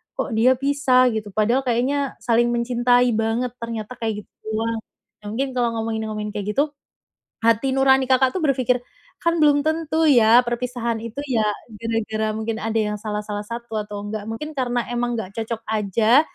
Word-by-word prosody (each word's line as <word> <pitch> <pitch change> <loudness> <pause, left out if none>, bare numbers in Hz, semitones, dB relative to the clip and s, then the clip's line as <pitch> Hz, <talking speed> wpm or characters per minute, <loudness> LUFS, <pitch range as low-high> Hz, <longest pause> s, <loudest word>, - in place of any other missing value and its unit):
kok 280 - -3
dia 235 +4 +4
pisah 260 -2 +3
gitu, 220 -2 -3
padahal 230 +5 +2
kayaknya 265 +4 0
saling 240 0 +2
mencintai 245 +1 +3
banget, 225 +3 0
ternyata 230 +1 -6
kayak 220 -2 -2
gitu", - - -21 0.7
nah, 210 - -11
mungkin 260 +6 -2
kalo 240 -2 0
ngomongin-ngomongin 220 -1 -3
kayak 210 0 -4
gitu, 290 +1 +2 0.7
hati 230 +3 +3
nurani 265 -1 +4
Kakak 260 0 +4
tuh 375 - -2
berfikir, 255 -5 +1 0.4
kan 335 -1 0
belum 290 -1 +4
tentu 315 0 0
ya, 240 -4 +6
perpisahan 240 -1 -2
itu 230 +6 -6
ya, 240 -6 +1 0.4
gara-gara 220 -1 -1
mungkin 220 0 -3
ada 225 0 -2
yang 210 -1 +1
salah 210 -1 -3
salah 205 -1 -4
satu 230 0 -5
atau 205 -1 -6
enggak, 210 0 -5
mungkin 300 +8 -5
karena 245 -4 -1
emang 240 0 -1
enggak 200 -4 -5
cocok 225 0 -4
aja 220 +4 +4
235 Hz, 165 wpm, -22 LUFS, 220-255 Hz, 0.7 s, ya